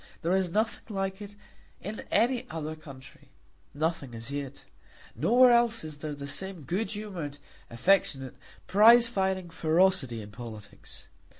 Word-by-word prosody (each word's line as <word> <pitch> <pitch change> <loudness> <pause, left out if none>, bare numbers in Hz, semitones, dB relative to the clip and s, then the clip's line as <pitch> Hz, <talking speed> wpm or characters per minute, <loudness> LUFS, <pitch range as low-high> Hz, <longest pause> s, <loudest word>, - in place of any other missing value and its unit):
There 175 +3 +2
is 190 -2 +1
nothing 215 +2 -2
like 195 +1 -3
it 205 0 -9 0.4
in 210 +2 -6
any 250 +2 +1
other 155 -1 -5
country, 140 -4 -14 0.4
nothing 145 -5 -2
as 115 +4 -7
yet. 140 -1 -6 0.5
Nowhere 245 - +5
else 235 -3 +3
is 155 -2 -8
there 150 -1 -5
the 140 0 -7
same 185 +3 -2
good 190 - -2
humoured, 190 -9 -6 0.3
affectionate, 135 -1 +1 0.3
prize 230 +4 +7
fighting 190 -5 -1
ferocity 160 - +2
in 105 - -12
politics. 110 -3 -11
175 Hz, 135 wpm, -28 LUFS, 140-205 Hz, 0.5 s, prize